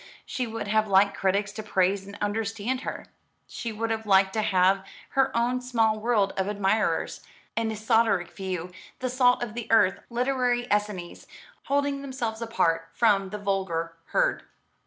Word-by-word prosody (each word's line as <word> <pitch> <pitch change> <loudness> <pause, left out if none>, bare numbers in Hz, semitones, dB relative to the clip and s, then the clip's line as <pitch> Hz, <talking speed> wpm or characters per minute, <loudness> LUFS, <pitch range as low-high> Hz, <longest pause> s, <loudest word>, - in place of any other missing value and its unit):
She 250 -2 -3
would 225 -2 -5
have 215 +1 +2
liked 200 0 +4
critics 200 +1 0
to 215 - -6
praise 195 -1 +1
and 200 0 -9
understand 225 +4 -2
her. - - -5 0.4
She 230 - -5
would 225 +1 -2
have 220 -1 -3
liked 190 -1 +4
to 220 - +1
have 190 -1 +3 0.3
her 270 0 +2
own 245 +2 +1
small 225 -3 +1
world 215 -3 +1
of 190 0 0
admirers, 205 +1 0 0.3
an 225 -1 0
esoteric 215 -3 +2
few, 185 -2 -5 0.3
the 255 -1 -3
salt 250 -1 +3
of 225 -3 -5
the 240 -1 -6
earth, 190 -4 +4
literary 245 0 0
Essenes, 205 -4 -3 0.4
holding 280 0 0
themselves 240 -5 -4
apart 165 -8 0
from 200 -4 +3
the 210 - -5
vulgar 190 -5 -2
herd. - - +1
215 Hz, 155 wpm, -26 LUFS, 195-240 Hz, 0.4 s, liked